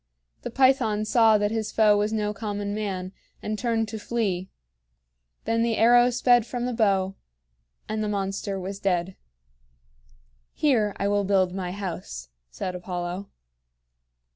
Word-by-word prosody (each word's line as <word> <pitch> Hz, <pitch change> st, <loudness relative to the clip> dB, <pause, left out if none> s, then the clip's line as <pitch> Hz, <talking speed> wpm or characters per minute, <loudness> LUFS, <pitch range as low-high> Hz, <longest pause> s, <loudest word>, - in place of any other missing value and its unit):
The -, -, -5 dB
Python 240 Hz, -5 st, +2 dB
saw 220 Hz, -1 st, +5 dB
that 205 Hz, 0 st, 0 dB
his 220 Hz, -1 st, -2 dB
foe 215 Hz, -2 st, +4 dB
was 205 Hz, +1 st, +1 dB
no 210 Hz, -1 st, -1 dB
common 205 Hz, -1 st, -4 dB
man, 190 Hz, -3 st, -3 dB, 0.3 s
and 215 Hz, -, -2 dB
turned 230 Hz, -3 st, 0 dB
to 220 Hz, -, -5 dB
flee. 200 Hz, -5 st, -2 dB, 1.0 s
Then 230 Hz, 0 st, +1 dB
the 230 Hz, -1 st, +1 dB
arrow 240 Hz, +2 st, +6 dB
sped 245 Hz, -1 st, +4 dB
from 240 Hz, +1 st, -4 dB
the 250 Hz, -, -2 dB
bow 195 Hz, -4 st, +1 dB, 0.7 s
and 215 Hz, 0 st, -2 dB
the 210 Hz, -, -1 dB
monster 195 Hz, 0 st, -2 dB
was 195 Hz, +2 st, -6 dB
dead. 185 Hz, -1 st, -1 dB, 1.4 s
"Here 225 Hz, -9 st, +1 dB
I 200 Hz, -, 0 dB
will 205 Hz, 0 st, +1 dB
build 190 Hz, -2 st, +2 dB
my 185 Hz, -2 st, -3 dB
house," 180 Hz, -, -6 dB, 0.2 s
said 120 Hz, -, -5 dB
Apollo. 180 Hz, +1 st, -5 dB
205 Hz, 140 wpm, -25 LUFS, 190-225 Hz, 1.4 s, arrow